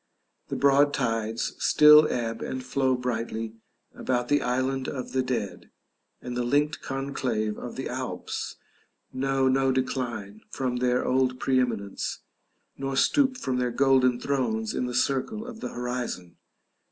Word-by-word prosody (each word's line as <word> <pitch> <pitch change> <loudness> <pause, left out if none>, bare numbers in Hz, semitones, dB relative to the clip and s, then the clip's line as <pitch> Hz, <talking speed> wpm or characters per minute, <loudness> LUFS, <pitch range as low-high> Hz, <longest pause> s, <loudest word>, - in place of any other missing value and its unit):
The - - -4
broad 140 +1 +4
tides 115 -3 -1
still 150 0 +7
ebb 115 -2 -2
and 130 -1 -4
flow 130 0 +1
brightly 115 -2 -3 0.4
about 125 -1 -1
the 145 0 +3
island 130 +1 -1
of 130 -3 -5
the 130 - +1
dead, 125 -6 -3 0.5
and 125 0 -5
the 125 - 0
linked 145 +5 +1
conclave 130 -6 -2
of - - -7
the - - -4
Alps - - -4 0.6
know 135 0 +1
no 135 0 +3
decline 120 -5 -3
from 125 -2 -2
their 125 0 +1
old 130 -1 +1
pre 130 -1 +2
eminence, 110 -6 -2 0.6
nor 135 0 -2
stoop 265 - +3
from 130 - -2
their 125 -1 +1
golden 130 0 +3
thrones 215 - -1
in 125 - -1
the 125 - -4
circle 140 - 0
of 240 -2 -8
the - - -4
horizon. 125 -8 -4
130 Hz, 145 wpm, -27 LUFS, 120-135 Hz, 0.6 s, still